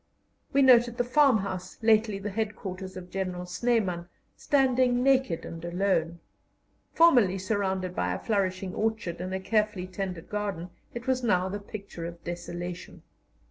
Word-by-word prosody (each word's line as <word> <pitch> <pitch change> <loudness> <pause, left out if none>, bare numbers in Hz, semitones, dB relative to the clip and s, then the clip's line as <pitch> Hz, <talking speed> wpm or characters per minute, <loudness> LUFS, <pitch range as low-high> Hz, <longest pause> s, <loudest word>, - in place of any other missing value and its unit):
We 275 - +4
noted 240 -2 +6
the 245 - +2
farmhouse 220 -9 +2
lately 220 -2 +4
the 200 +1 -5
headquarters 190 -3 -4
of 180 -1 -9
General 185 -2 -3
Snyman, 180 -3 0 0.3
standing 255 -3 +2
naked 265 -10 +2
and 165 0 -8
alone. 170 -2 0 0.7
Formerly 245 - +5
surrounded 190 -2 -1
by 90 0 0
a 90 - -1
flourishing 190 -3 -1
orchard 215 -6 -2
and 185 +1 -4
a 190 - -2
carefully 210 -2 0
tended 185 -2 -5
garden, 200 -4 -3 0.2
it 240 0 -6
was 260 -1 +1
now 190 -6 +2
the 205 +2 -4
picture 200 -4 -7
of 170 0 -10
desolation. 175 0 -6
195 Hz, 140 wpm, -28 LUFS, 180-225 Hz, 0.7 s, noted